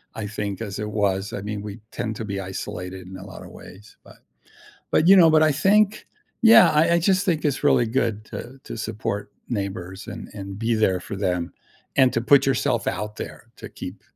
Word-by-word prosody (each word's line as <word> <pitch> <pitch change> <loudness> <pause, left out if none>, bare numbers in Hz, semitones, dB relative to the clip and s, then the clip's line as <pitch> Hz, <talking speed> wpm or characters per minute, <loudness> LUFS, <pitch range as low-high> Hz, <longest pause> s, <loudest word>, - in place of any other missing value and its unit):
I 105 -2 -4
think, 100 -1 -4
as 100 -3 -5
it 105 0 -3
was. 100 -2 -1
I 100 - -4
mean, 105 0 -4
we 105 +2 -8
tend 110 -1 -4
to 115 - -5
be 100 -1 -4
isolated 95 0 -6
in 95 0 -9
a 95 - -10
lot 95 - -10
of - - -11
ways, 100 +4 -14
but - - -17 0.7
But, 165 - +3
you 195 - +9
know, 165 -3 +7
but 155 0 +5
I 155 -1 +4
think 205 +7 +2 0.4
Yeah, 225 0 +8
I 160 +3 +3
I - - +4
just 190 +2 +2
think 165 -4 0
it's 145 0 -1
really 120 -4 +4
good 115 -3 -1
to 130 +3 -8
to - - -7
support 105 -2 -4 0.2
neighbors 95 -4 -5
and - - -7
and 100 -1 -7
be 115 +1 0
there 95 -4 +2
for 100 - -7
them, 90 -3 -2 0.4
and 130 -2 +5
to 115 - +1
put 135 +2 +5
yourself 135 -3 0
out 105 0 -3
there - - -8
to - - -9
keep, - - -9
110 Hz, 210 wpm, -23 LUFS, 100-140 Hz, 0.7 s, you